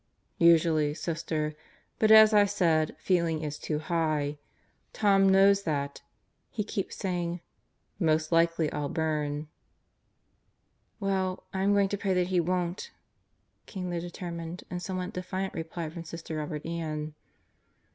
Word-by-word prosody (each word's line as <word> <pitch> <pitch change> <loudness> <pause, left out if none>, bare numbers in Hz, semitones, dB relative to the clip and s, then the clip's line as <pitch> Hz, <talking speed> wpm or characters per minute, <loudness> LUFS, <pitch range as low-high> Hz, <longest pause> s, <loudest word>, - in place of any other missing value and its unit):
"Usually, 160 -3 +4
Sister. 155 -2 -2 0.5
But, 220 - +3
as 220 0 +9
I 205 -1 +6
said, 165 -6 +1
feeling 170 -4 0
is 150 -1 -4
too 155 - -2
high. 155 -3 -1 0.5
Tom 195 -2 +4
knows 195 +1 +5
that. 140 -5 -3 0.5
He 215 - -3
keeps 200 -2 -4
saying: 175 -2 -2 0.6
'Most 155 -2 +1
likely 165 -2 +2
I'll 145 -1 -3
burn.' 150 -1 -2 0.8
" - - -47 0.7
"Well, 190 -2 -1
I'm 195 +1 +2
going 200 -1 +3
to 205 - -3
pray 195 -2 0
that 180 0 +1
he 185 -1 +2
won't," 175 +1 -1 0.8
came 180 -3 -5
the 170 -1 -2
determined 170 -1 -6
and 180 0 -3
somewhat 185 0 -4
defiant 185 +1 -4
reply 165 0 -5
from 170 0 -7
Sister 165 -1 -7
Robert 150 0 -4
Ann. 155 -2 -4
170 Hz, 135 wpm, -28 LUFS, 155-190 Hz, 0.8 s, as